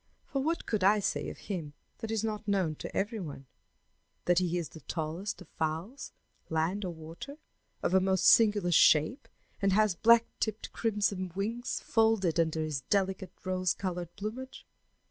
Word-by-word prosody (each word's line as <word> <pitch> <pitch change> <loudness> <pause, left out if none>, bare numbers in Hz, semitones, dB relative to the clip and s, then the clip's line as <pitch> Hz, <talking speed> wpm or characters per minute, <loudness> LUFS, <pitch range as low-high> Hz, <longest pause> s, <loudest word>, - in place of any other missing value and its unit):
For 275 - -2
what 325 +4 -1
could 210 -4 -1
I 205 +3 +6
say 205 - -1
of - - -9
him 165 -8 -5 0.3
that 225 - -5
is 220 -1 -1
not 215 -1 -3
known 190 -6 +1
to - - -6
every 215 +3 -1
one 145 -6 -7 0.8
that 175 0 +4
he 180 -1 0
is 170 -3 -3
the 160 - -12
tallest 160 +6 -4
of - - -23
fowls, 160 - -4 0.4
land 165 +6 0
or 180 - -2
water, 165 - -9 0.5
of - - +1
a 190 - +6
most 190 0 +1
singular 205 -5 +5
shape, 155 - +4 0.3
and 195 -1 +3
has 215 -1 +4
black 230 +6 +5
tipped 220 -1 -3
crimson 200 -4 0
wings 230 +5 -2
folded 220 -7 +2
under 160 -1 +1
his 150 -3 -3
delicate 190 +2 -1
rose 185 -1 +1
colored 175 -2 -4
plumage? 225 +6 -6
190 Hz, 165 wpm, -30 LUFS, 170-215 Hz, 0.8 s, I